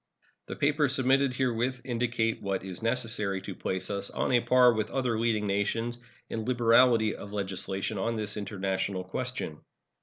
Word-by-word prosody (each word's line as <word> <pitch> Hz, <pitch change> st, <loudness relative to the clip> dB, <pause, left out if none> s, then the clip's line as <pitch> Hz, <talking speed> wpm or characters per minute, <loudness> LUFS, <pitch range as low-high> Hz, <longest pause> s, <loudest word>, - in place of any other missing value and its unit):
The -, -, -5 dB
papers 145 Hz, -1 st, +2 dB
submitted 135 Hz, +1 st, +3 dB
herewith 125 Hz, 0 st, 0 dB
indicate 115 Hz, -2 st, 0 dB
what 95 Hz, -2 st, -2 dB
is 95 Hz, -2 st, -6 dB
necessary 115 Hz, -4 st, 0 dB
to -, -, -5 dB
place 95 Hz, +2 st, -3 dB
us 100 Hz, 0 st, -2 dB
on -, -, -1 dB
a 125 Hz, -, +5 dB
par 125 Hz, +1 st, +5 dB
with 110 Hz, -1 st, -1 dB
other 125 Hz, -4 st, 0 dB
leading 110 Hz, -2 st, +1 dB
nations 115 Hz, +4 st, -1 dB, 0.3 s
in 110 Hz, -, -4 dB
liberality 115 Hz, -2 st, +4 dB
of 100 Hz, +1 st, -9 dB
legislation 95 Hz, +1 st, -3 dB
on 115 Hz, +4 st, -1 dB
this 105 Hz, -2 st, -3 dB
international 95 Hz, -2 st, -2 dB
question. 120 Hz, -5 st, -4 dB
115 Hz, 155 wpm, -29 LUFS, 100-125 Hz, 0.3 s, a